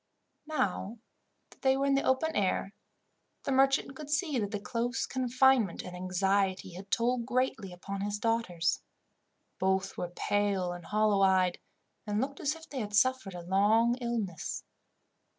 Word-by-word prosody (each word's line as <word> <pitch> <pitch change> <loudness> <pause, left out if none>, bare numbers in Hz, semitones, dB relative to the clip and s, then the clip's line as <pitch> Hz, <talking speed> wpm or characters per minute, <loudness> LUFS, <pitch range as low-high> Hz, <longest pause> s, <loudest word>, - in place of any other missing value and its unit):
Now 225 - -1 0.5
that - - -20
they 265 0 +3
were 275 - +1
in 280 - +3
the 275 - +3
open 300 +5 +1
air, 195 0 0 0.7
the - - -2
merchant 270 +1 +3
could 295 +1 -8
see 295 -3 +1
that 205 -2 -1
the 205 -1 -3
close 240 +4 -2
confinement 255 -5 +2
and 180 - -8
anxiety 190 +1 0
had 190 +3 -10
told 235 +2 +1
greatly 250 -6 -1
upon 195 +2 -6
his 205 +1 -2
daughters. 205 -7 0 0.8
Both 190 0 0
were 175 - -2
pale 195 0 0
and 175 -1 -8
hollow 210 -1 +2
eyed, 185 -2 +3 0.5
and 210 0 0
looked 275 +3 -2
as 295 +2 0
if 325 0 -13
they 275 - -5
had 205 -2 -3
suffered 255 -4 +2
a 175 - -6
long 210 +6 +3
illness. 230 -9 -3
210 Hz, 155 wpm, -30 LUFS, 190-260 Hz, 0.8 s, they